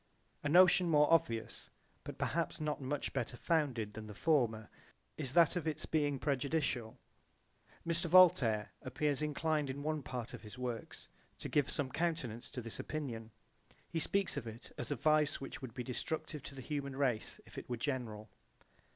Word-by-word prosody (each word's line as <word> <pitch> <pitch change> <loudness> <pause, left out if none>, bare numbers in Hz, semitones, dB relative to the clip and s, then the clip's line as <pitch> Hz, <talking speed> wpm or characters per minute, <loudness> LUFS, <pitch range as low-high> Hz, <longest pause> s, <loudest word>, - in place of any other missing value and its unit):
A 145 - -1
notion 180 +1 +6
more 150 0 +5
obvious, 115 -8 0 0.3
but - - -7
perhaps - - -1
not 150 -2 -2
much 135 +2 -2
better 120 -2 -2
founded 130 -10 0
than 110 0 -7
the 105 - -9
former 115 -9 +2 0.5
is 135 -4 -3
that 170 0 +6
of 170 -2 -2
its 155 - 0
being 145 -3 +1
prejudicial 135 -4 0
to - - -24 0.9
population. 170 +1 +2
Mr. - - -12
Voltaire 130 - +6
appears 145 +3 -1
inclined 150 -1 0
in 140 +2 -4
one 155 0 -1
part 125 -1 -5
of - - -7
his 110 +2 -10
works 125 -2 -5 0.3
to - - -5
give 145 -3 +2
some 140 -4 -2
countenance 155 -9 -2
to 125 - -6
this 115 - -6
opinion. 120 -8 -4 0.6
He 165 - 0
speaks 195 -1 +1
of 125 -4 -4
it 115 +1 -9
as 120 - -4
a 145 - 0
vice 155 +3 +3
which 135 - -7
would 125 -4 -7
be 125 - -3
destructive 150 +4 -4
to 140 - -8
the 135 - -7
human 140 -2 -3
race 130 -5 0
if - - -8
it - - -12
were 120 - -2
general. 115 -5 -3
140 Hz, 180 wpm, -35 LUFS, 120-155 Hz, 0.9 s, notion